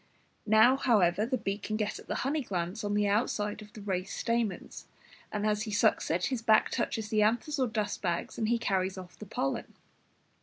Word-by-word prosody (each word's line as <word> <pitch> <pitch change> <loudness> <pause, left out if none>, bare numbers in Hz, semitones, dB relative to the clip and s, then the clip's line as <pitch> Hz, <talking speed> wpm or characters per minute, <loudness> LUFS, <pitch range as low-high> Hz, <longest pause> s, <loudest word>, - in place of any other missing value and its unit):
Now, 220 +5 +6
however, 210 -5 +3
the 255 +1 0
bee 195 -2 -3
can 215 +1 -3
get 210 -1 -2
at - - -14
the - - -2
honey 295 +3 0
glands 185 -2 -3
on 205 0 -1
the 210 0 +2
outside 210 0 0
of 210 0 -12
the 215 - -9
raised 190 -2 -3
stamens; 230 -5 -2 0.4
and 210 0 -2
as 210 -1 +1
he 215 0 -4
sucks 215 +1 +2
it, 175 +3 +1
his 255 -4 -2
back 220 -2 +4
touches 220 -3 -2
the 215 -1 +2
anthers 240 +7 +1
or 260 - +2
dust 215 -2 -2
bags, 170 -3 -2
and 220 -1 0
he 235 - +3
carries 190 -3 -1
off 185 -1 -10
the 215 - -9
pollen. 135 -6 -3
210 Hz, 205 wpm, -30 LUFS, 195-225 Hz, 0.4 s, Now